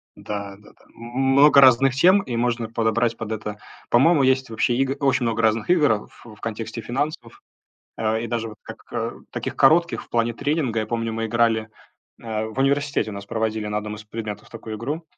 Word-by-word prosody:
Да 100 -1 -6
да-да. 105 - -21
М 115 - -14
м 135 - 0
много 140 +1 +7
разных 130 0 +6
тем, 185 +7 +5
и 125 -10 -5
можно 120 -1 -1
подобрать 115 +1 0
под 110 -1 -6
это. 105 -1 -5 0.3
По-моему, 140 +5 +4
есть 130 -1 +2
вообще 115 +2 0
игы 135 0 0
очень 135 -3 +2
много 115 0 0
разных 110 +2 +1
игр, 150 -7 +4
а, 105 -1 -1
в 110 -3 -15
в - - -22
контексте 115 +1 -5
финансов. 120 +1 -4 0.6
А, 110 0 0
и 115 - -4
даже 115 -1 -3
вот 105 - -12
как, - - -10
э, - - -2 0.2
таких - - -4
коротких 170 +5 +3
в - - -24
плане 115 0 0
тренинга. 135 -3 -1
Я 110 - -2
помню, 115 -1 -2
мы 115 0 -2
играли 115 -1 +1 0.5
э, 110 -2 -3
в 110 +4 -6
университете 140 -2 +1
у - - -7
нас 100 0 -8
проводили 110 0 -2
на 105 - -2
одном 105 0 -4
из 105 - -11
предметов 105 -1 -7
такую 110 -1 -7
игру. 145 +9 -4
115 Hz, 205 wpm, -23 LUFS, 110-135 Hz, 0.6 s, много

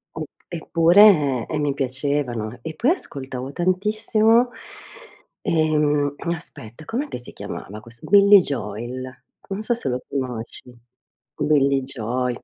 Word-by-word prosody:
Mh, 155 - -4 0.2
eppure 165 - +4
e 155 - -3
mi 145 -2 0
piacevano. 130 -4 -2
E 160 -1 -6
poi 255 - +2
ascoltavo 135 - -5
tantissimo, 215 - +2 0.9
ehm 150 -3 +1 0.2
aspetta, 150 -4 -11
com'è 270 +6 -3
che - - -6
si 125 - -9
chiamava 105 +3 -7
questo? 115 +1 -13
Billie 200 -1 +8
Joel. 125 +1 -5 0.3
Non 195 +2 -3
so 240 +2 0
se 230 - -3
lo 125 +1 -2
conosci. 125 -2 -5 0.6
Billie 140 -2 +2
Joel 125 -1 -3
145 Hz, 120 wpm, -22 LUFS, 125-180 Hz, 0.9 s, Billie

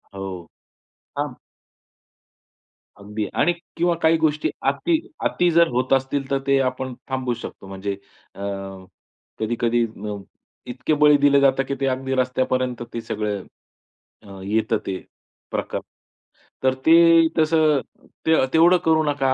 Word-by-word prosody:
हो. 95 - -5 0.9
हां. - - -3 1.6
अगदी. 105 0 -5
आणि 175 - +2 0.2
किंवा 170 0 +2
काही 160 +1 +5
गोष्टी 155 -1 +1 0.2
अति 330 -2 +1 0.3
अति 175 0 +2
जर 170 0 +5
होत 125 +2 0
असतील 135 +1 0
तर 135 - +2
ते 140 0 +4
आपण 130 0 -2 0.2
थांबू 130 -2 -1
शकतो. 115 -4 -9
म्हणजे 95 +1 -4 0.4
अ, - - -13 1.0
कधी-कधी 120 +1 +1
अ, 105 -2 -6 0.5
इतके 130 +5 -1
बळी 150 0 +5
दिले 140 0 +4
जातात 135 -1 +3
की 140 - -2
ते 135 - 0
अगदी 130 0 -2
रस्त्यापर्यंत 130 -1 0
ते 115 - -3
सगळं 105 -3 -3 0.8
अ, 100 -2 -11
येतं 110 +2 0
ते 95 - -2 0.5
प्रकार. - - -3 0.8
तर 130 0 +3
ते 165 0 +7
तसं 155 -2 +3 0.5
ते 160 -4 +4
तेवढं 170 +3 +6
करू 160 -1 +4
नका. 135 -2 +1
130 Hz, 130 wpm, -22 LUFS, 115-155 Hz, 1.6 s, ते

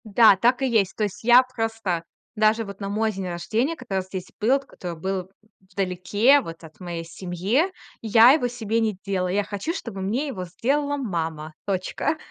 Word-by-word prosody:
Да, 215 0 +6
так 245 +7 +2
и 265 - +2
есть. 210 -6 +1
То 215 - -1
есть 205 0 -4
я 245 +2 +7
просто, 225 -8 -3 0.3
даже 215 +1 +3
вот 200 -1 -9
на 200 -1 -4
мой 220 +2 0
день 190 -2 -5
рождения, 215 - -1
когда 200 -10 -3
здесь 185 -1 -7
был, 225 +4 +3
вот 275 0 0
который 175 -9 -8
был 190 +1 -3 0.4
вдалеке 200 +8 +3
вот 165 -6 -9
от 160 -1 -14
моей 175 -2 -5
семье, 185 - -1 0.3
я 225 +2 +7
его 275 -4 +2
себе 230 -2 -2
не 220 -4 0
делала. 190 -2 -1
Я 200 +3 +1
хочу, 205 - -4
чтобы 225 - -6
мне 230 +10 -1
его 190 -10 -5
сделала 285 - -1
мама! 165 - -3
Точка. 195 - -1
205 Hz, 185 wpm, -24 LUFS, 185-240 Hz, 0.4 s, я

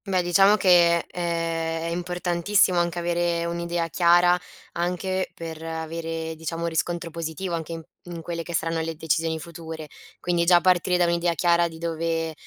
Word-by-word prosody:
Beh, 185 -2 +1
diciamo 195 +4 +5
che 175 -4 +4
è 165 -1 -2
è 165 - -3
importantissimo 175 +1 +1
anche 175 0 -1
avere 170 0 0
un'idea 170 0 -2
chiara, 175 +1 +4 0.3
anche 180 +2 -2
per 165 -1 -7
avere 165 0 -4
diciamo 165 +1 -4
riscontro 170 +1 -2
positivo 165 +2 -4
anche 165 0 -3
in 165 0 -7 0.2
in 170 -2 -7
quelle 170 0 -4
che 170 +1 -5
saranno 165 +1 -1
le 165 0 -4
decisioni 160 +1 0
future. 160 -1 -8 0.3
Quindi 175 -1 0
già 175 0 +6
partire 180 0 +3
da 175 - +3
un'idea 170 0 +1
chiara 170 +1 +3
di 165 -1 -10
dove 165 -1 -2
170 Hz, 160 wpm, -25 LUFS, 165-175 Hz, 0.3 s, già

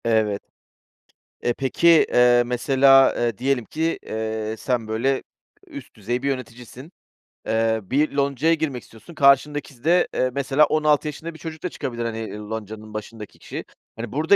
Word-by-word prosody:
Evet. 110 -3 +1 1.0
Eee, 120 - +1
peki, 135 +6 0 0.3
eee, 125 0 +5
mesela, 135 +2 +4
eee, 120 -3 -1
diyelim 130 -1 0
ki, 160 +7 -2
eee, 110 0 -3
sen 120 -2 -2
böyle 125 +5 0 0.4
üst 285 -5 -11
düzey 120 +3 -3
bir - - -1
yöneticisin. 130 +2 -6 0.6
Eee, 110 0 +1
bir 140 +10 0
loncaya 140 +3 +1
girmek 145 -7 -2
istiyorsun 115 +10 -15
karşındaki 140 -2 +2
de, 175 +3 +3
eee, 130 - +1
mesela 140 +2 +3
16 150 0 +2
yaşında 160 +3 -6
bir 160 - -14
çocuk 160 -1 -8
da 180 - -1
çıkabilir, 120 -7 -5
hani, 115 -1 -4
ııı, 105 0 -8
loncanın 110 -1 -7
başındaki 110 0 -8
kişi. - - -7 0.3
Hani, 115 -1 -6
burada 160 +8 +3
125 Hz, 155 wpm, -23 LUFS, 110-145 Hz, 1.0 s, eee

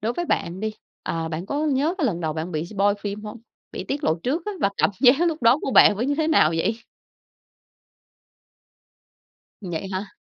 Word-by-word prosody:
đối 225 +3 -1
với 345 - -3
bạn 180 - -2
đi, 215 0 -3 0.3
ờ, 165 -1 -3
bạn 165 +3 -5
có 295 +5 -1
nhớ 295 +4 +1
cái 300 - +1
lần 175 -8 -2
đầu 160 -2 -1
bạn 160 +3 -5
bị 155 +1 -2
spoil 200 +1 +1
phim 205 +1 -5
hông? 210 +2 -8 0.3
Bị - - -5
tiết 285 +2 -3
lộ 160 - +3
trước 295 +7 -1
á 420 - -2
và 200 - +2
cảm - - +2
giác 265 +3 +6
lúc 320 -4 -4
đó 235 +4 +5
của - - -2
bạn 210 -4 +6
với 240 - -1
như 285 - +1
thế 315 +1 0
nào 275 - +4
vậy? 215 +7 -1 2.8
Vậy 185 -1 -5
hả? 195 +2 -4
215 Hz, 205 wpm, -23 LUFS, 180-280 Hz, 2.8 s, giác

